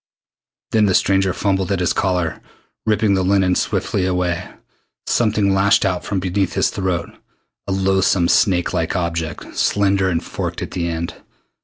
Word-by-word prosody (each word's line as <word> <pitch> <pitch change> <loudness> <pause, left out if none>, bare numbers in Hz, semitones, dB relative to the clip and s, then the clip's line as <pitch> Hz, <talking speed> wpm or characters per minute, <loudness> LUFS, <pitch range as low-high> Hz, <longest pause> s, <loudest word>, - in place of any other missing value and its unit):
Then 110 -2 +3
the 95 - +2
stranger 95 -1 +2
fumbled 95 -1 -1
at 95 - 0
his 90 - +1
collar, 90 -4 -1 0.5
ripping 105 -1 +2
the 95 - +2
linen 95 -1 +2
swiftly 95 +1 -1
away. 90 -1 -1 0.6
Something 105 -4 +1
lashed 100 +1 +3
out 90 -2 -1
from 100 - -2
beneath 95 +1 -1
his - - +1
throat 90 -3 -2 0.6
a - - -2
loathsome 95 -2 +2
snake 90 -2 +2
like 80 +3 -1
object, 85 -3 -3
slender 100 -2 +2
and 85 -2 -1
forked - - -4
at - - -7
the 85 -2 -2
end. 85 0 -5
95 Hz, 155 wpm, -19 LUFS, 90-100 Hz, 0.6 s, Then